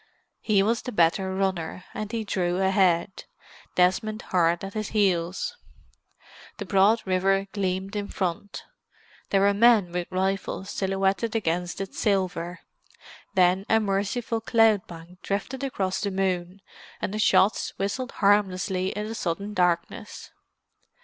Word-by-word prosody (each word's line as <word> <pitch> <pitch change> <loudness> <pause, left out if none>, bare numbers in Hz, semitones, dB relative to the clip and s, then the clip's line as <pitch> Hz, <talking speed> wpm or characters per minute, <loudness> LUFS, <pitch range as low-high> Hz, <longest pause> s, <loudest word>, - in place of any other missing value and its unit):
He 200 -3 +2
was 230 +3 +1
the 250 - -6
better 190 +1 +2
runner, 185 -2 -2
and 215 0 -5
he 230 -2 -2
drew 180 -4 -1
ahead, 190 -1 +1 0.5
Desmond 215 +4 +1
hard 170 -1 +1
at 195 0 -6
his 215 -1 -3
heels. 185 - 0 1.0
The 205 - -5
broad 200 +4 +3
river 195 +1 +1
gleamed 190 0 -2
in 205 -1 -2
front—there 195 +1 -5
were 200 +1 +4
men 210 -4 +4
with 175 0 -3
rifles 190 +1 -2
silhouetted 195 +3 0
against 175 -4 -1
its 195 -1 -5
silver. 185 -3 -1 0.7
Then 185 +1 +4
a 220 - +5
merciful 215 +3 -1
cloud 225 -2 +3
bank 170 +2 -12
drifted 250 +7 -3
across 190 -8 -2
the 205 - -1
moon, 190 -1 -2 0.4
and 200 - -3
the 215 - -3
shots 210 -1 +3
whistled 235 +6 -3
harmlessly 190 -2 +1
in 210 +1 -4
the 225 - -5
sudden 200 -1 -3
darkness. 175 -3 -1
195 Hz, 130 wpm, -26 LUFS, 185-210 Hz, 1.0 s, a